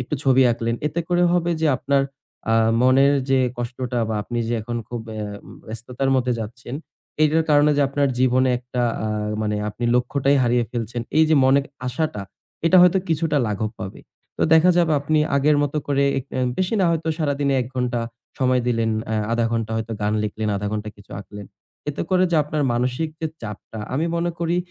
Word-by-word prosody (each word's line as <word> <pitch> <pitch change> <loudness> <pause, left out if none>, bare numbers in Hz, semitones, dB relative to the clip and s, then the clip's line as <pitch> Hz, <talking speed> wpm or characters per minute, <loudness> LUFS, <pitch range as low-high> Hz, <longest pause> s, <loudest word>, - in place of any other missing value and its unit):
একটু 125 - -3
ছবি 135 -1 +4
আঁকলেন। 115 0 -1
এতে 155 +3 -1
করে 175 0 +2
হবে 175 -1 +1
যে 160 - +2
আপনার 140 +1 +1 0.5
আ - - +4 0.3
মনের 135 +3 +5 0.2
যে 135 - +4 0.2
কষ্টটা 120 0 -3
বা 110 - -1
আপনি 120 +3 -4
যে 120 - 0
এখন 120 +2 -4
খুব 120 -1 -4
অ্যা 105 -1 -4 0.4
ব্যস্ততার 120 +4 -3
মধ্যে 125 -1 +1
যাচ্ছেন, 120 +3 -7 0.5
এইটার 155 +1 +3
কারণে 145 0 +5
যে 145 - +3
আপনার 140 0 +1
জীবনে 130 0 +3
একটা 125 0 -4 0.2
আ - - -1 0.4
মানে 105 -1 -1
আপনি 110 +3 -5
লক্ষ্যটাই 135 +3 +2
হারিয়ে 120 0 +2
ফেলছেন 120 0 -3 0.2
এই 160 - +6
যে 160 - +4
মনের 135 +1 +4 0.2
আশাটা 125 -3 -2 0.4
এটা 185 - +5
হয়তো 180 +1 +5
কিছুটা 160 -1 0
লাঘব 105 0 -2
পাবে। 95 0 -7 0.4
তো - - -1
দেখা 165 +3 +6
যাবে 170 -2 +3
আপনি 155 +2 +1 0.2
আগের 145 +2 +3
মতো 145 +1 -2
করে 140 -1 +1 0.2
এক 130 - -6
অ্যা 130 - -1 0.2
বেশি 185 +3 0
না - - +4
হয়তো 165 -1 -1
সারাদিনে 140 -2 0
১ 125 - -3
ঘন্টা 125 -1 -1 0.4
সময় 130 -2 +2
দিলেন, 115 -2 +1 0.2
অ্যা 110 - -1 0.2
০.৫ 115 0 +1
ঘন্টা 115 -1 -1
হয়তো 110 0 -3
গান 105 0 0
লিখলেন, 105 +1 -3
০.৫ 105 - -3
ঘন্টা 105 0 -3
কিছু 100 -1 -18
আঁকলেন। 105 0 -10 0.4
এতে 145 - -2
করে 185 0 +4
যে 170 - +2
আপনার 150 0 -2
মানসিক 125 +6 -1
যে 160 - 0 0.2
চাপটা 110 +1 -8 0.2
আমি 155 +5 0
মনে 170 +1 0
করি 170 +1 0
130 Hz, 190 wpm, -22 LUFS, 115-150 Hz, 0.5 s, এই